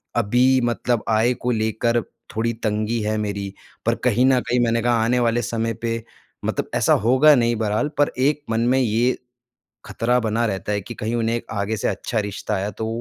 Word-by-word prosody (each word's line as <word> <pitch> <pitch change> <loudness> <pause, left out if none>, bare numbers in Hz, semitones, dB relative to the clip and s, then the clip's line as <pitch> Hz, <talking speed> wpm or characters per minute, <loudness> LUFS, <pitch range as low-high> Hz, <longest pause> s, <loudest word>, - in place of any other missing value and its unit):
अभी 125 +4 +3
मतलब 120 0 0
आय 115 +3 +3
को 125 0 -2
लेकर 115 +1 0 0.3
थोड़ी 115 +1 0
तंगी 110 +1 0
है 110 +1 -1
मेरी। 100 -2 -3 0.3
पर - - +2
कहीं 125 0 +3
न 130 -1 +4
कहीं 125 +1 0
मैंने 115 -1 +2
कहा 120 +1 +2
आने 125 +2 +2
वाले 120 0 +1
समय 115 0 -2
पे 115 -1 -2 0.4
मतलब - - -2
ऐसा - - +3
होगा 130 +6 +6
नहीं 120 -2 +2
बरहाल 110 +5 0
पर 145 0 +3
एक 145 +3 +1
मन 115 - 0
में 130 - +3
ये, 120 +1 +1 0.7
ख़तरा 125 +2 0
बना 115 0 0
रहता 95 -2 -3
है 100 -1 -1
कि 120 - -8
कहीं 110 +3 -3
उन्हें 115 0 0
आगे 105 +1 -2
से - - -1
अच्छा 115 - -2
रिश्ता 105 +1 -4
आया 100 +2 -2
तो 110 +3 -5
115 Hz, 195 wpm, -22 LUFS, 110-120 Hz, 0.7 s, होगा